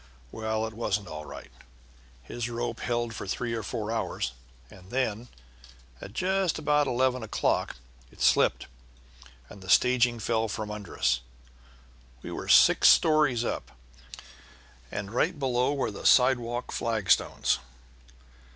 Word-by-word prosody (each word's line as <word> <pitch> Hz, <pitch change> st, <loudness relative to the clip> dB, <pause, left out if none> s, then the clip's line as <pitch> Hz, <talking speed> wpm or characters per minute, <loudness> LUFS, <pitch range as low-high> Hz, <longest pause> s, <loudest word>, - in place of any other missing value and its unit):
Well, 110 Hz, 0 st, -2 dB
it 110 Hz, -, -6 dB
wasn't 105 Hz, -3 st, -2 dB
all 75 Hz, -1 st, -7 dB
right; -, -, -10 dB, 0.7 s
his 120 Hz, -, -5 dB
rope 120 Hz, 0 st, -4 dB
held 120 Hz, -1 st, -2 dB
for 100 Hz, -, -7 dB
three 120 Hz, +5 st, -3 dB
or 115 Hz, -, -2 dB
four 110 Hz, -1 st, -4 dB
hours, 110 Hz, -, -2 dB, 0.4 s
and 95 Hz, 0 st, -15 dB
then, 120 Hz, -2 st, -2 dB, 0.7 s
at 100 Hz, -, -9 dB
just 190 Hz, +2 st, 0 dB
about 150 Hz, -1 st, +2 dB
eleven 130 Hz, 0 st, +1 dB
o'clock, 110 Hz, -, -1 dB, 0.4 s
it -, -, -20 dB
slipped, -, -, +3 dB, 0.8 s
and 100 Hz, -, -13 dB
the 95 Hz, -, -11 dB
staging 125 Hz, 0 st, +4 dB
fell 115 Hz, 0 st, 0 dB
from 105 Hz, 0 st, -5 dB
under 105 Hz, -3 st, -8 dB
us. -, -, +2 dB, 1.0 s
We -, -, -7 dB
were -, -, -6 dB
six -, -, +6 dB
stories 150 Hz, -7 st, +4 dB
up, 60 Hz, -, -4 dB, 1.2 s
and 100 Hz, 0 st, -5 dB
right 160 Hz, +7 st, +1 dB
below 130 Hz, -1 st, +1 dB
were 135 Hz, -, -1 dB
the -, -, -2 dB
sidewalk 125 Hz, -2 st, +3 dB
flagstones. 110 Hz, -, +1 dB
115 Hz, 135 wpm, -27 LUFS, 110-125 Hz, 1.2 s, six